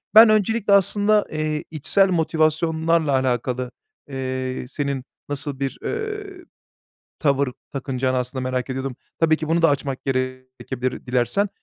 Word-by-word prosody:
Ben 220 0 +10
öncelikle 215 0 +3
aslında, 205 +2 +4
eee, 155 0 -1
içsel 190 +6 +3
motivasyonlarla 160 -1 +2
alakalı, 125 -1 0 0.4
eee, 130 -1 -3
senin 140 -1 -2 0.3
nasıl 140 -1 -3
bir, 135 -1 -2
eee, 415 -4 -4 0.7
tavır 140 -2 +2 0.2
takınacağını 130 -1 -1
aslında 125 +1 -3
merak 130 0 -2
ediyordum. 130 -1 -3 0.2
Tabii 160 -1 +4
ki 155 0 -5
bunu 165 +1 +2
da 165 - +7
açmak 140 -2 -1
gerekebilir 130 -1 -3
dilersen. 125 - +1
140 Hz, 125 wpm, -23 LUFS, 130-165 Hz, 0.7 s, Ben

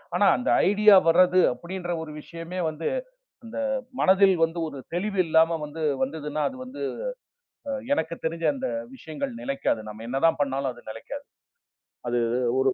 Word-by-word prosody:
ஆனா - - +4
அந்த 255 - -2 0.2
ஐடியா 205 +1 +7
வர்றது 180 +2 +5
அப்படின்ற 175 +6 -6
ஒரு 160 -1 -7
விஷயமே 165 +3 -7
வந்து 155 +1 -4 0.6
அந்த 230 +4 -7 0.4
மனதில் 190 -1 +5 0.3
ஒரு 140 -2 -8 0.2
தெளிவு 200 +3 -2
இல்லாம 165 +1 +4
வந்து 150 +2 -7 0.2
வந்ததுன்னா 150 +2 -3
அது 265 - -10
வந்து 255 +2 -9 1.1
எனக்குத் 170 - -1
தெரிஞ்ச 165 +1 -2
அந்த 265 -1 -3 0.3
விஷயங்கள் 260 - -5
நிலைக்காது. 275 - -1
நாம 105 +1 -8
என்னதான் 135 +6 +2
பண்ணாலும் 135 -1 -1
அது 120 0 -16
நிலைக்காது. 280 - -8 0.8
அது 120 0 +1 0.4
ஒரு 135 - +3
165 Hz, 135 wpm, -26 LUFS, 150-195 Hz, 1.1 s, ஐடியா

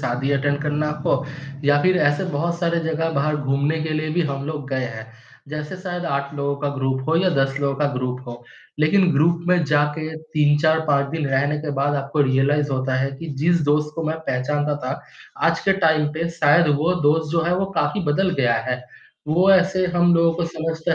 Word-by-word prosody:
शादी 130 +2 -2
अटेंड 145 +1 0
करना 150 0 -1 0.2
हो, 135 +1 +1 0.4
या 145 0 +4
फिर 185 0 +3
ऐसे 145 +6 -1
बहुत 170 +4 -1
सारे 170 -1 +1
जगह 160 0 -1
बाहर 150 +2 0
घूमने 145 +2 0
के 160 - -3
लिए 155 0 -2
भी 175 - +2
हम 140 0 -4
लोग 150 -3 -5
गए 130 -1 -1
हैं। 110 -2 -7 0.4
जैसे 150 +4 -5
शायद 180 -1 -5
8 140 -2 -2
लोगों 140 0 -2
का 145 - -1
ग्रुप 130 0 -2
हो 165 - +3
या 185 +2 +3
10 135 0 +1
लोगों 140 -1 0
का 145 0 +1
ग्रुप 125 0 -3
हो, 120 0 -9 0.4
लेकिन 180 +4 +3
ग्रुप 165 +4 +2
में 180 -2 +3
जाके 150 +1 0
3, 155 -2 +1
4, 160 +1 +3
5 140 -1 +2
दिन 160 -2 -2
रहने 145 +3 +1
के 150 0 -4
बाद 145 +1 +1
आपको 140 +2 -2
रियलाइज़ 140 +2 +1
होता 130 0 -1
है 135 +1 0
कि, 165 - -7
जिस 170 +3 +2
दोस्त 150 0 +1
को 165 - -4
मैं 160 - -2
पहचानता 145 +3 0
था, 130 - -3 0.5
आज 165 0 0
के 195 - +4
टाइम 155 -1 +3
पे 165 +2 -2
शायद 150 +3 +5
वो 165 +5 +1
दोस्त 155 +1 +2
जो 165 -1 +2
है, 170 +2 +1
वो 195 - 0
काफ़ी 205 - 0
बदल 185 +5 +1
गया 120 -2 +3
है। 125 0 -2 0.5
वो 180 +5 +4
ऐसे 185 0 +3
हम 175 0 +4
लोगों 165 0 +3
को 170 0 -1
समझता 165 +1 -2
150 Hz, 210 wpm, -21 LUFS, 140-165 Hz, 0.5 s, शायद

